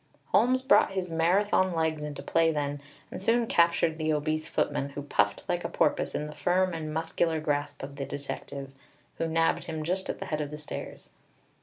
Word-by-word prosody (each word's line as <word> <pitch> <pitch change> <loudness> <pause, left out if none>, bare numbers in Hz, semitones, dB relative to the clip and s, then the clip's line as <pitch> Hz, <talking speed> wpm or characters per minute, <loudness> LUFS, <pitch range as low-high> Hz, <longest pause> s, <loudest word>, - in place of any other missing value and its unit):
Holmes 255 +1 +3
brought 265 -7 +5
his 185 -2 -2
Marathon 185 +2 +2
legs 160 -1 0
into 150 -1 -5
play 165 0 +3
then, 145 -1 -2 0.3
and - - -6
soon 230 +4 +3
captured 170 -4 +3
the 155 0 +1
obese 155 +1 -1
footman, 140 -1 -1
who 140 0 -6
puffed 105 -7 +1
like - - -1
a - - -2
porpoise - - +1
in 150 - -1
the 150 - -7
firm 185 +2 +1
and 155 -2 -4
muscular 160 +1 0
grasp 145 -2 -2
of 140 +1 -7
the 140 - -3
detective, 140 -1 -6 0.5
who 165 - 0
nabbed 165 0 +1
him 160 -2 -4
just 185 +4 -2
at - - -2
the - - -6
head 155 -1 -2
of 145 - -3
the 150 - -6
stairs. 150 - -8
160 Hz, 195 wpm, -28 LUFS, 145-170 Hz, 0.5 s, brought